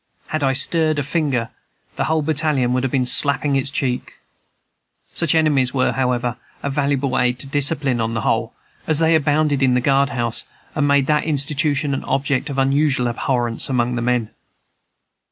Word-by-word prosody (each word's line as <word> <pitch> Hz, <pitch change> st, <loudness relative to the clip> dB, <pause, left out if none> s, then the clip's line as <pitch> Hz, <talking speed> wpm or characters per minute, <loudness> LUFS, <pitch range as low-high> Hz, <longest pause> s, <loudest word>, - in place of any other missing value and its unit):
Had 155 Hz, -, -2 dB
I 135 Hz, -1 st, +2 dB
stirred 155 Hz, +2 st, +1 dB
a 145 Hz, -, 0 dB
finger, 140 Hz, -6 st, -1 dB, 0.5 s
the -, -, -1 dB
whole 160 Hz, -1 st, 0 dB
battalion 145 Hz, -5 st, 0 dB
would 130 Hz, -, +1 dB
have 135 Hz, -1 st, -2 dB
been 130 Hz, -3 st, +1 dB
slapping 140 Hz, +2 st, +2 dB
its 135 Hz, 0 st, 0 dB
cheeks. 130 Hz, -3 st, -2 dB, 1.0 s
Such 165 Hz, -2 st, +2 dB
enemies 140 Hz, -5 st, +2 dB
were, 130 Hz, -, +2 dB
however, 125 Hz, -2 st, -1 dB, 0.3 s
a 140 Hz, -, -2 dB
valuable 140 Hz, -1 st, 0 dB
aid 125 Hz, 0 st, +1 dB
to 135 Hz, -, -2 dB
discipline, 140 Hz, -3 st, +1 dB
on 115 Hz, +1 st, -2 dB
the 110 Hz, -, -1 dB
whole, 115 Hz, +1 st, 0 dB, 0.4 s
as 155 Hz, -, +2 dB
they 165 Hz, +1 st, +3 dB
abounded 150 Hz, -2 st, +1 dB
in 130 Hz, -2 st, +3 dB
the -, -, +3 dB
guard 140 Hz, +2 st, +2 dB
house, 120 Hz, -4 st, -1 dB, 0.3 s
and 150 Hz, -2 st, 0 dB
made 140 Hz, -1 st, +3 dB
that 150 Hz, +1 st, +1 dB
institution 145 Hz, -1 st, +1 dB
an 135 Hz, -, -3 dB
object 135 Hz, 0 st, -1 dB
of 140 Hz, -, -5 dB
unusual 135 Hz, -1 st, +2 dB
abhorrence 120 Hz, 0 st, -1 dB
among 125 Hz, -2 st, 0 dB
the 120 Hz, -, -2 dB
men. 120 Hz, -2 st, -1 dB
135 Hz, 175 wpm, -20 LUFS, 125-145 Hz, 1.0 s, they